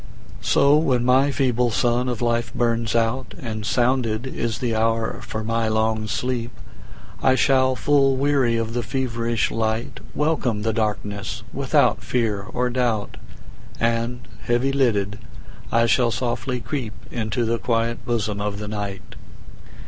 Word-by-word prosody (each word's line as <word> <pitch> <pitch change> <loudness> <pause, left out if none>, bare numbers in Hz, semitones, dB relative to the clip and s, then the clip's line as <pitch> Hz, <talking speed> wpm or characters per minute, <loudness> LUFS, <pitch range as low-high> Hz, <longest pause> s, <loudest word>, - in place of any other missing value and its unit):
So 140 +2 +4
when 130 -6 +1
my 130 +3 +4
feeble 125 -3 +1
sun 120 +2 +1
of 120 -1 -2
life 115 0 0
burns 115 -1 0
out, 115 +3 0
And 110 -6 -4
sounded 120 -2 +1
is 115 -4 -2
the 115 0 -1
hour 115 0 0
for 110 - -5
my 115 0 0
long 110 0 0
sleep,I 125 +2 -3
shall, 130 -1 +3
full 135 +1 +3
weary 135 -4 +2
of 115 0 -2
the 120 - 0
feverish 115 -3 -1
light, 110 +1 -2 0.2
Welcome 135 -9 0
the 110 0 0
darkness 105 -2 -2
without - - +2
fear 110 -5 0
or 125 +5 -2
doubt, 120 -4 -1 0.6
And 115 +1 -1
heavy 120 +3 +1
lidded, 105 -7 +1 0.5
I 115 0 +4
shall 120 +1 +3
softly 125 +2 -2
creepInto 115 -1 -3
the 115 +1 0
quiet 115 0 -1
bosom 110 -4 -1
of 100 -1 -2
the 105 0 -5
Night. 100 -2 -5
115 Hz, 135 wpm, -23 LUFS, 110-125 Hz, 0.6 s, So